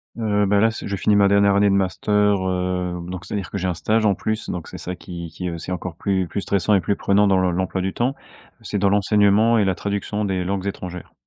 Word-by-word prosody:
Heu, 105 -3 +1
ben, 100 +1 +3
là, 110 - +5
ç 115 - -7
je 100 - -2
finis 105 +3 +2
ma 100 -1 +5
dernière 100 0 +4
année 100 0 +4
de - - +2
master, 95 +2 -1 0.3
heu, 90 -1 -2
donc 90 0 -7
c'est-à-dire 95 -1 -4
que - - -4
j'ai 95 -1 -2
un 90 - 0
stage 110 +6 0
en 100 - +4
plus, 110 +3 -3
donc 90 -3 -5
c'est - - -9
ça 90 - -5
qui 85 -2 -8
qui, 90 -1 -5
heu, 85 - -5
c'est 85 +2 -7
encore 90 -1 -4
plus 95 -1 -1
plus 100 - -3
stressant 100 +2 +1
et 95 - +3
plus 100 +4 0
prenant 100 +1 +2
dans 95 -1 +3
l'em 90 - +2
l'emploi 95 0 -1
du 95 0 -2
temps. 125 +3 0 0.5
C'est 105 - -3
dans 100 0 +2
l'enseignement 105 +3 +3
et 105 - +3
la 95 - +2
traduction 100 +2 -3
des 95 -3 -1
langues 95 +1 -2
étrangères. 90 -2 -6
100 Hz, 255 wpm, -22 LUFS, 90-105 Hz, 0.5 s, là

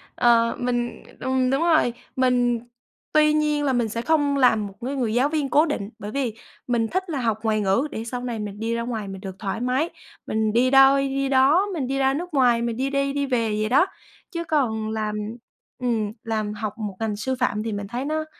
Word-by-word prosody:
Ờ, 230 -1 +4
mình 240 -1 -2 0.2
ừm, 260 -1 +1
đúng 270 +3 +1
rồi, 315 -8 +3 0.2
mình 245 -2 +2 0.5
tuy 305 0 +5
nhiên 300 -1 +1
là 270 -2 +1
mình 235 -3 +1
sẽ 230 +2 -3
không 290 -1 +2
làm 220 -6 +3
một 195 - -11
cái 275 +2 -2
người 235 -5 -1
giáo 255 +5 +3
viên 295 -3 -1
cố 300 +5 +4
định, 215 -10 -3
bởi 210 - -6
vì 255 -3 -1 0.3
mình 235 -2 +1
thích 375 +4 -2
là 290 - -2
học 225 -2 0
ngoại 215 -1 +1
ngữ 205 +9 +2
để 220 - -4
sau 245 +1 -5
này 235 -3 -3
mình 205 -1 -6
đi 225 +1 -1
ra 235 - -1
ngoài 225 -4 -4
mình 195 0 -7
được 190 -2 -7
thoải 200 +1 -3
mái, 255 +6 +1 0.4
mình 220 0 0
đi 245 +2 +3
đâu 270 0 +7
đi 275 0 0
đó, 280 +9 +4
mình 275 -7 -2
đi 270 - -1
ra 270 0 +3
nước 345 +4 -4
ngoài, 245 -4 +4
mình 235 -1 -2
đi 265 +2 0
đi 275 0 0
đi 285 0 0
về 240 -4 0
vậy 215 - 0
đó. 280 +9 +5 0.5
Chứ 335 -1 -3
còn 235 -9 0
làm 215 -1 -2 0.6
ừm, 225 -4 0
làm 215 -2 -2
học 210 0 -4
một 210 -4 -4
ngành 220 -2 -1
sư 260 +5 -2
phạm 215 -4 0
thì 225 - -3
mình 205 -1 -4
thấy 245 +5 -4
nó 310 +1 -1
245 Hz, 230 wpm, -24 LUFS, 220-275 Hz, 0.6 s, đâu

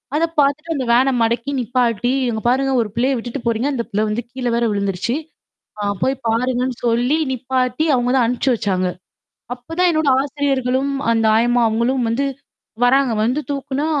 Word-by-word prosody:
அதை 320 +2 +3
பாத்துட்டு 305 +4 +1
அந்த 260 -3 -2
வேனை 260 +3 +4
மடக்கி 235 +4 0
நிப்பாட்டி, 245 -1 0 0.2
இங்க 220 -2 -3
பாருங்க, 270 +2 +1
ஒரு 215 - -3
பிள்ளைய 260 +3 +1
விட்டுட்டு 240 +3 -5
போறீங்க, 235 +4 0
அந்த 235 -3 -2
பிள்ள 210 0 0
வந்து 225 +3 -2
கீழ 255 -1 -6
வேற 235 - +1
விழுந்துருச்சு, 200 +3 -1 0.6
ஆ, - - -3 0.2
போய் 265 - +1
பாருங்கன்னு 250 +2 0
சொல்லி 245 +6 +2
நிப்பாட்டி 255 +3 -1
அவங்க 245 0 0
தான் 250 -3 +3
அனுப்பிச்சு 250 +2 +1
வச்சாங்க. 185 -4 -1 0.7
அப்பதான் 330 +9 -1
என்னோட 315 -2 +1
ஆசிரியர்களும் 275 -1 -1 0.2
அந்த 225 -1 +2
ஆயம்மா 240 +1 +3
அவங்களும் 235 +3 0
வந்து 265 +5 0 0.6
வர்றாங்க. 265 0 +3
வந்து 255 +6 0
தூக்குனா 280 +1 -2
250 Hz, 160 wpm, -19 LUFS, 235-270 Hz, 0.7 s, வேனை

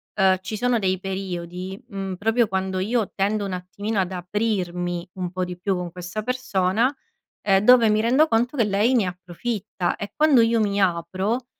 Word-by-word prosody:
ehm, 190 -2 +4
ci 195 +3 -5
sono 245 +1 +1
dei 185 -2 0
periodi, 185 -1 -5
mhmm, 195 -1 -4
proprio 225 +4 +2
quando 190 -1 -2
io 220 +2 0
tendo 205 +1 0
un 195 - -4
attimino 200 +4 -3
ad 185 -1 0
aprirmi 180 -2 -2
un 180 -2 -4
po' 185 0 -2
di 180 0 -7
più 195 +1 0
con 180 -1 -4
questa 180 +4 -5
persona, 235 0 +1 0.5
ehm, 195 -1 +4
dove 245 -1 +7
mi 215 - +3
rendo 260 +8 +4
conto 240 +5 +1
che 230 - +3
lei 210 +5 +2
ne 220 -6 +3
approfitta 180 +1 -3
e 205 - -6
quando 300 -5 +5
io 230 0 +3
mi 205 -1 +1
apro, 190 +7 0
195 Hz, 180 wpm, -23 LUFS, 185-225 Hz, 0.5 s, dove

